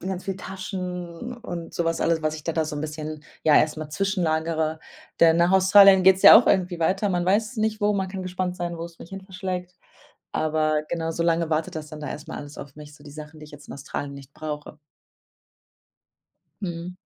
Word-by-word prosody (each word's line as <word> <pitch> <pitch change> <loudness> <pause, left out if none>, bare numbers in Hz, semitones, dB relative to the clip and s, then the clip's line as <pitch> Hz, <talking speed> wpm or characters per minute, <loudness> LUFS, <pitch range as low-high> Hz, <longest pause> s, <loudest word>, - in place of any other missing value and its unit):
ganz 185 0 -5
viel 195 -2 -3
Taschen 185 +2 -6
und 175 -8 -7
so 170 - -1
was 165 0 -1
alles, 165 -1 +1
was 155 0 0
ich 155 - -11
da 165 - -1
da 160 -1 0
so 150 -1 -5
'n - - -4
bisschen 155 0 -6 0.2
ja, 150 -2 +5
erst 155 0 +3
mal 155 -1 -6
zwischenlagere. 160 -4 -1 0.4
Denn 165 0 +6
nach 170 +1 +3
Australien 190 0 +7
geht's 190 0 +5
ja - - +11
auch 245 - 0
irgendwie 180 -2 +1
weiter. 190 +5 +1
Man 175 -2 0
weiß 215 +5 +2
es - - -14
nicht, 215 0 -1
wo. 205 0 +2
Man 190 -2 -1
kann 190 0 -6
gespannt 180 0 -3
sein, 175 -1 -4
wo's 165 0 -8
mich - - -11
hinverschlägt. 185 -2 -6 0.6
Aber 155 -1 0
genau, 165 -1 -2
so 170 - -2
lange 165 -1 +1
wartet 160 0 -1
das 155 -1 -5
dann 155 - -9
da 150 -3 -5
erst 150 +2 -8
mal 160 - -6
alles 145 0 -10
auf 135 0 -10
mich 150 -1 -12
so 145 - -19
die 145 - -12
Sachen, 155 +1 -10
die 155 - -10
ich 150 - -16
jetzt 145 -1 -13
in - - -8
Australien 140 0 -6
nicht 140 0 -12
brauche. 150 0 -7 1.8
Mhm. 175 0 -5
170 Hz, 220 wpm, -24 LUFS, 155-185 Hz, 1.8 s, ja